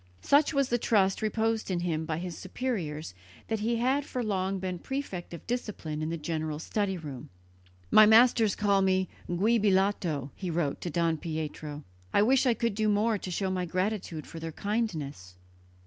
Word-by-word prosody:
Such 285 +1 +4
was 275 -3 +1
the 240 - +1
trust 195 -4 +2
reposed 220 0 0
in 175 -2 0
him 160 -2 -1
by 155 -1 -2
his 175 0 -5
superiors 180 - -4 0.4
that 220 -1 0
he 230 +3 0
had 260 +5 +1
for 255 -3 -4
long 195 -2 -1
been 185 -1 -4
prefect 265 -10 -5
of 170 - -9
discipline 205 -10 -3
in 155 - -2
the 170 - -2
general 155 -1 -3
study 190 +4 -1
room. 145 -7 -8 0.6
"My 215 0 +8
masters 225 -2 +6
call 200 -1 +2
me 190 -1 +2 0.2
'Giubilato'," 190 - +1
he 185 - -4
wrote 160 -4 -1
to 175 - -3
Don 165 0 +1
Pietro. 155 -2 -5 0.3
"I 205 - +6
wish 260 +3 +4
I 240 - +4
could 230 -2 0
do 215 +1 +1
more 210 +1 +2
to 185 - -6
show 190 +2 -1
my 180 -1 -1
gratitude 185 -3 -2
for 165 - -9
their 165 0 -5
kindness." 155 - -3
190 Hz, 180 wpm, -29 LUFS, 165-220 Hz, 0.6 s, My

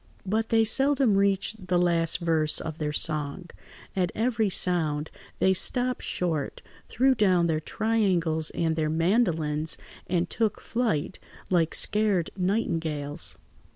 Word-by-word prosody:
But 220 +3 -1
they 225 -1 +4
seldom 270 -1 +2
reached 195 0 0
the 180 -1 +1
last 170 -2 +2
verse 160 -2 +2
of 160 -1 -6
their 150 -1 -2
song; 150 +3 -1 0.4
at 180 -2 0
every 220 -2 0
sound 160 -5 0 0.3
they 190 - +3
stopped 250 +6 +1
short, 160 -6 -3 0.3
threw 265 +3 +3
down 185 -7 +2
their 160 -2 0
triangles 175 -5 0
and 165 -1 -1
their 155 -1 -1
mandolines, 160 -3 0 0.3
and 175 0 0
took 220 +3 -1
flight 220 -9 -2 0.3
like 165 -3 +2
scared 210 -5 +2
nightingales. 165 -7 -1
180 Hz, 125 wpm, -26 LUFS, 160-215 Hz, 0.4 s, they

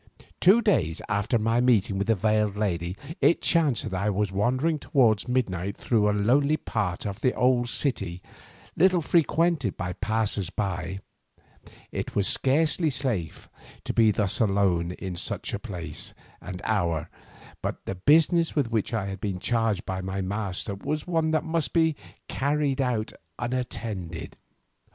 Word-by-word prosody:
Two 205 +6 +5
days 95 - +1
after 105 +3 +1
my 115 +2 +1
meeting 105 -6 +2
with 100 - -1
the 115 - +3
veiled 105 0 +1
lady 90 -3 -2 0.2
it 170 - +4
chanced 155 -8 +2
that - - -5
I 100 +3 0
was 105 -1 0
wandering 130 +11 +1
towards 115 -8 +2
midnight 100 -6 -1
through 105 -3 +2
a - - +3
lonely 135 +9 +2
part 100 - -3
of 100 -1 -5
the 130 - +2
old 125 -1 +2
city 100 - -1 0.6
little 180 -1 +3
frequented 165 - +1
by 90 -3 -3
passers 105 -3 -1
by. 95 -2 -3 0.9
It - - -5
was 100 -1 +2
scarcely 155 +4 +3
safe 125 - -3 0.4
to - - -3
be 115 -1 +5
thus 105 -1 0
alone 95 -5 +1
in 95 -1 -6
such 85 - -3
a 100 - -2
place 95 -8 -5 0.3
and 90 - -7
hour, 85 -8 0 0.5
but - - -4
the - - -3
business 160 - +3
with 135 -6 0
which 115 0 -1
I 105 -3 -1
had 95 -1 -6
been 100 -2 -2
charged 115 -1 0
by 95 0 -3
my 95 +1 -4
master 100 +1 -2
was 150 +10 -3
one 165 -3 0
that 155 -1 +1
must 165 -1 -1
be 160 -2 +3 0.3
carried 140 -1 0
out 120 -4 -1 0.2
unattended. 115 -8 -4
110 Hz, 155 wpm, -26 LUFS, 95-135 Hz, 0.9 s, Two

